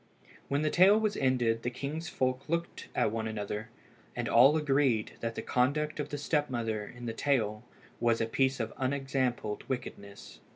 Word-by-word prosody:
When 140 +2 0
the 155 - +1
tale 195 +4 +6
was 215 -2 0
ended 120 -4 +1
the 120 - -1
king's 145 +7 -5
folk 130 +2 -1
looked 170 +1 -2
at - - +2
one 110 0 -2
another, 105 0 -4 0.5
and 120 -1 -2
all 135 +6 +6
agreed 135 -7 +2
that 115 0 -3
the - - -4
conduct 150 +5 0
of 145 0 -3
the 145 - -4
step 150 0 0
mother 110 -4 -2
in 120 0 -10
the 115 - -3
tale 115 -5 0 0.4
was 115 -1 +2
a 115 - +1
piece 130 +3 +1
of 115 -1 -3
unexampled 130 -5 -1
wickedness. 100 -6 -6
130 Hz, 175 wpm, -30 LUFS, 115-145 Hz, 0.5 s, tale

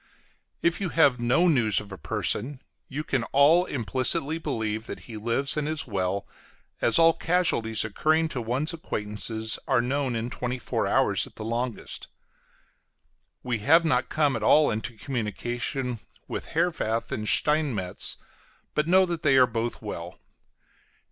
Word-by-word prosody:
If 170 +3 +1
you 190 - -1
have 145 -7 +4
no 120 +9 +3
news 120 - +3
of 105 -1 -10
a - - -6
person, 130 - -1 0.3
you 145 +3 -4
can 135 -5 -1
all 150 +8 +4
implicitly 135 - 0
believe 110 -7 -3
that - - -7
he 115 - -10
lives 115 +6 -1
and 150 0 -1
is 155 -1 -1
well, 100 -2 -2 0.6
as - - +5
all 165 0 +6
casualties 115 - +1
occurring 155 +9 +1
to 130 - -3
one's 130 +9 -1
acquaintances 110 -6 -2
are 130 -4 +3
known 130 +1 -1
in 115 +2 -3
twenty 125 +1 -3
four 125 - -2
hours - - +2
at - - -18
the 110 - -7
longest. 120 +1 -4 1.4
We 120 -3 -1
have 165 +10 +4
not 125 -6 +1
come 150 -3 +1
at 115 - -3
all 150 +7 +5
into 110 +1 -4
communication 120 +1 -3 0.3
with - - -5
Herwarth 115 -10 0
and 105 0 -2
Steinmetz, 140 -12 0 0.6
but 150 +1 0
know 185 +2 +5
that 170 -3 -4
they 135 -3 +4
are 130 - +7
both 115 0 -4
well. - - -7
125 Hz, 155 wpm, -26 LUFS, 110-155 Hz, 1.4 s, are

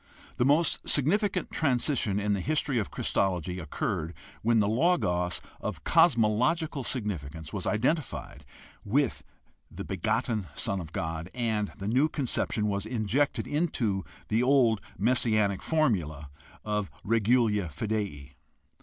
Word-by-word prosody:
The 120 - +2
most 150 +4 +2
significant 185 - +1
transition 125 -7 +1
in 105 0 +1
the 100 - 0
history 145 +2 0
of 105 - -2
Christology 90 -2 -1
occurred 80 +1 -3 0.3
when 115 0 +3
the 105 - +3
Logos 105 - +1 0.2
of - - -5
cosmological 135 +3 +3
sig 125 -3 -3
nificance 80 -5 -5
was - - -3
identified 125 - -1 0.4
with 135 +5 +1 0.5
the - - -7
begotten 110 +2 -1
Son 100 - 0
of 80 -3 -7
God 80 +1 -4
and 110 -4 -1
the 100 -1 -5
new 130 +8 +3
conception 125 -6 0
was 100 0 -1
injected 125 +5 0
into 120 - 0 0.2
the 110 +2 +2
old 125 -5 +4 0.2
messianic 110 -5 +2
formula 85 - 0 0.3
of 105 -2 -1
regula 110 -2 +2
fidei. 85 -5 -3
110 Hz, 125 wpm, -28 LUFS, 95-130 Hz, 0.5 s, old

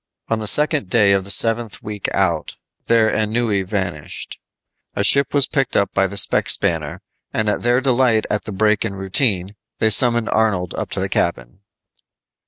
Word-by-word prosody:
On 115 - 0
the 110 - -5
second 150 - +2
day 105 -2 +3
of 95 -1 +1
the - - -9
seventh 115 +3 0
week 105 -2 -4
out, 85 -5 -1 0.3
their 115 -1 +3
ennui 110 -1 0
vanished. 95 -6 -5 0.6
A 100 - -1
ship 140 +8 +4
was 140 -2 +3
picked 135 -4 -1
up 100 - 0
by 95 0 +1
the 100 +1 -8
spec 100 - +2
spanner, - - 0 0.3
and 110 -1 -2
at 105 - -1
their 120 +1 +2
delight 125 -4 +2
at 105 - -3
the - - -6
break 105 +1 +1
in 105 -3 -4
routine, 95 0 0 0.2
they 110 -1 +1
summoned 120 0 +3
Arnold 100 -6 0
up - - -5
to - - -4
the - - -1
cabin. - - -3
105 Hz, 180 wpm, -19 LUFS, 95-115 Hz, 0.6 s, ship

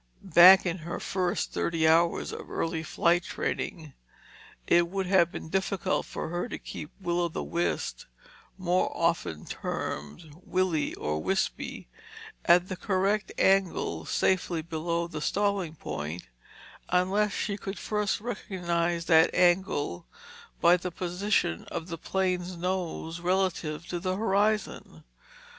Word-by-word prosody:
Back 185 +3 +9
in 175 0 -1
her 170 +2 -5
first 185 -2 -1
thirty 165 -1 +1
hours 165 +1 +3
of - - -8
early 165 -1 -2
flight 170 +2 +2
training, 160 -3 -4 0.7
it 170 0 +4
would 195 +1 -2
have 180 -2 +4
been - - -7
difficult 190 +1 -1
for - - -5
her 175 +1 -3
to - - -4
keep 150 - -8
Will 175 -2 0
o' 175 - +2
the 165 - -4
Wisp 170 +1 -2 0.5
(more 185 -1 +1
often 165 - 0
termed 75 - -5
Willie 180 -5 0
or 75 +1 -2
Wispy) - - -2 0.6
at 175 +1 +5
the 185 - -4
correct 195 +3 0
angle 190 - +2
safely 175 -3 +1
below 170 +1 -2
the 155 -3 -6
stalling 200 -3 0
point, 80 - -5 0.7
unless 190 +4 +2
she 200 +1 -2
could 195 -1 -6
first 210 0 -1
recognize 175 -6 -2
that 160 -2 +6
angle 175 - +1 0.5
by 175 +1 +6
the 180 +1 -4
position 180 - -1
of 170 +1 -6
the 165 - -4
plane's 185 -1 -1
nose 175 -2 -3
relative 175 -3 -1
to 175 - -2
the 185 +2 -1
horizon. 210 +1 0
175 Hz, 130 wpm, -28 LUFS, 165-190 Hz, 0.7 s, Back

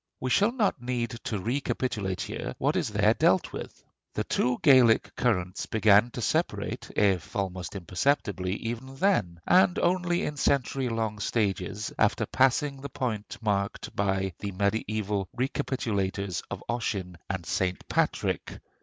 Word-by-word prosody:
We 130 - -2
shall 205 - +4
not 215 - 0
need 120 -2 -2
to 115 -5 -1
recapitulate 110 -3 -2
here - - -4
what - - +1
is - - 0
there - - +3
dealt - - +2
with. - - -8 0.3
The - - 0
two 125 0 +1
Gaelic 130 -5 +5
currents 90 -6 0
began 110 +1 +5
to 120 - -4
separate, - - -1
if 95 -6 +1
almost 95 -2 -3
imperceptibly, 95 - 0
even 120 +4 -5
then; 135 - +1
and 180 0 +5
only 175 -1 +1
in 150 - -3
century 135 -2 +1
long 110 -2 -2
stages, 100 -1 -1
after - - +3
passing 135 +1 +2
the 140 - -6
point 110 -6 -3
marked 100 -2 -1
by 95 -2 0
the 100 - -4
mediæval 105 0 -1
recapitulators 100 -8 -1
of - - -6
Ossian 100 -7 -2
and 95 -3 -3
St. 90 +2 -1
Patrick. - - -1
110 Hz, 140 wpm, -28 LUFS, 95-130 Hz, 0.3 s, Gaelic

